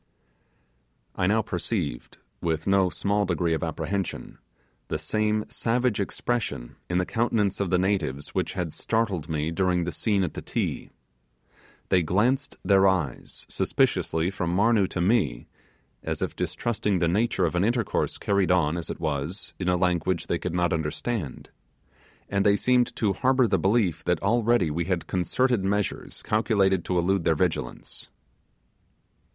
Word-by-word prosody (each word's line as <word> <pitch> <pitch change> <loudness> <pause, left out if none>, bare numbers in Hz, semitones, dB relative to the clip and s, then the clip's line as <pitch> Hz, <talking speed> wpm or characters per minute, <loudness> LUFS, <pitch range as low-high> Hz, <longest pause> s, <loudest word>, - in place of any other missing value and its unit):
I 90 - +1
now 110 +3 +3
perceived, 90 - -3 0.2
with 80 -1 -1
no 95 -1 +3
small 100 +3 0
degree 85 -1 +1
of 80 - -1
apprehension, 100 -2 -3 0.5
the - - -2
same 105 0 0
savage 120 -1 0
expression 100 - -2
in 90 - +1
the 90 - +1
countenances 110 -3 0
of 100 - 0
the 90 - +3
natives, 90 -8 -1
which - - -2
had 90 -4 -3
startled 105 -9 -1
me 80 0 -1
during 90 0 +1
the 90 - -2
scene 100 +4 +1
at 85 - -2
the - - -6
Ti. - - -3 1.0
They 90 - +4
glanced 120 - +1
their 100 -1 +5
eyes 80 -10 -2
suspiciously 80 +3 +1
from 85 -3 -2
Marnoo 105 -1 +3
to 90 - -3
me, 90 - +1 0.6
as - - -3
if - - -3
distrusting 105 -4 -1
the 85 - +2
nature 95 +1 +1
of 80 - -1
an 90 +1 +1
intercourse 115 0 0
carried 100 -2 +1
on, 85 -3 +2
as 85 - -5
it - - -5
was, 80 +4 -3
in 90 -1 0
a 90 - +3
language 90 -1 0
they 85 - -1
could 90 -1 -3
not 90 0 +2
understand, 80 - -3 0.8
and 100 0 +1
they 100 0 +5
seemed 125 +3 +2
to 105 -4 +1
harbour 130 +2 +3
the 95 -4 +1
belief 95 -4 +1
that 90 -2 +1
already 115 -4 +2
we 85 +2 -1
had 90 -2 -1
concerted 115 +4 +1
measures 100 +1 -2
calculated 100 -4 +2
to 90 - 0
elude 90 +1 +1
their 80 - +3
vigilance. 80 -7 -3
95 Hz, 155 wpm, -26 LUFS, 85-105 Hz, 1.0 s, their